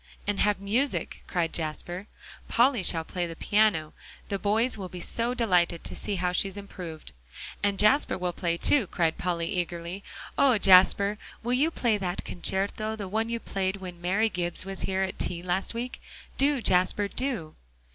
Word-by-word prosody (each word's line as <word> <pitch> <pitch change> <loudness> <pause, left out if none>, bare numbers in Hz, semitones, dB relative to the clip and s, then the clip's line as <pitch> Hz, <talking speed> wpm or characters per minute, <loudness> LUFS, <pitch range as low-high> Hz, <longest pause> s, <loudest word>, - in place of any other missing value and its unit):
"And 205 -1 -1
have 205 -2 +2
music," 230 +8 -1
cried 170 -2 -1
Jasper. 175 +4 -4 0.4
"Polly 245 -1 +3
shall 165 -2 +3
play 180 +2 -5
on - - -6
the 165 - -7
piano. 200 -6 +2 0.4
The 200 - -1
boys 220 +5 +2
will 190 -4 -6
be 180 - -8
so 235 +7 -1
delighted 180 -8 +2
to - - -4
see 205 - -3
how 180 -1 0
she 180 +2 +2
has 195 - -7
improved." 180 - -8 0.5
"And 200 -1 +1
Jasper 240 +9 +4
will 180 -1 -2
play 170 -1 -1
too," 245 +2 +3
cried 165 -2 0
Polly 170 -2 -1
eagerly. 175 +2 -3 0.4
"Oh, 260 -5 +6
Jasper! 200 +2 +5 0.2
will 240 +2 0
you 285 +6 +3
play 235 -9 +1
that 180 -1 -3
concerto, 200 +4 -2
the 205 -3 -5
one 220 +4 -1
you 230 0 -2
played 190 -3 -2
when 180 -3 -9
Mary 195 +5 +2
Gibbs 175 -3 -2
was 195 0 -4
here 190 0 0
at 190 - -4
tea 175 -1 -2
last 185 +5 -2
week? 245 +2 -5 0.3
Do, 275 -2 +2
Jasper, 185 +3 +3
do." 225 - -3
195 Hz, 180 wpm, -27 LUFS, 175-220 Hz, 0.5 s, Oh